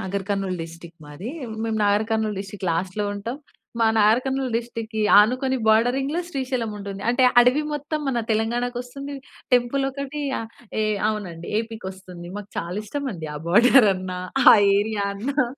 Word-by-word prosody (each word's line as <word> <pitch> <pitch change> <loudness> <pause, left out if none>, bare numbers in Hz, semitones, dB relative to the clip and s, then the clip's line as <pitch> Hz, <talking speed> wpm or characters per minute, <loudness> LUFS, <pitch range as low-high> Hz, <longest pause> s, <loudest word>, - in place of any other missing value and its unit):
Nagar 190 0 -3
Kurnool 195 -2 -1
district 165 0 -11
మాది. 150 +9 -8 0.4
మేము 225 -1 -1
Nagar 205 +1 +3
Kurnool 220 -3 0
district 195 -1 -6
లాస్ట్‌లో 185 +5 -2
ఉంటాం. 230 +6 -5 0.4
మా 225 - +5
నాగర్ 215 +3 +5
కర్నూల్ 265 -2 -2
డిస్ట్రిక్ట్‌కి 230 -2 -4 0.2
ఆనుకుని 255 +5 +3
బోర్డరింగ్‌లో 255 +8 +2
శ్రీశైలం 255 -6 -2
ఉంటుంది. 200 -1 -7
అంటే 245 +2 +2 0.2
అడవి 250 +5 +4
మొత్తం 295 +1 -3
మన 240 -3 0
తెలంగాణా 225 +3 0
కొస్తుంది. 275 +3 -6 0.4
టెంపులొకటి 270 +3 -1 0.2
ఆహ్, 225 - -6 0.3
ఏ - - +1 0.2
అవునండి 180 -6 -5
ఏపీ‌ 225 -1 -7
కొస్తుంది. 185 -2 -8
మాకు 205 0 -10
చాలా 175 +3 -4
ఇష్టమండి. 215 - -4
ఆ - - -4
బోర్డరన్నా 195 -4 +4 0.3
ఆ - - +9 0.2
ఏరియా 210 0 -1
అన్నా. 260 +7 0
220 Hz, 145 wpm, -23 LUFS, 195-255 Hz, 0.4 s, ఆ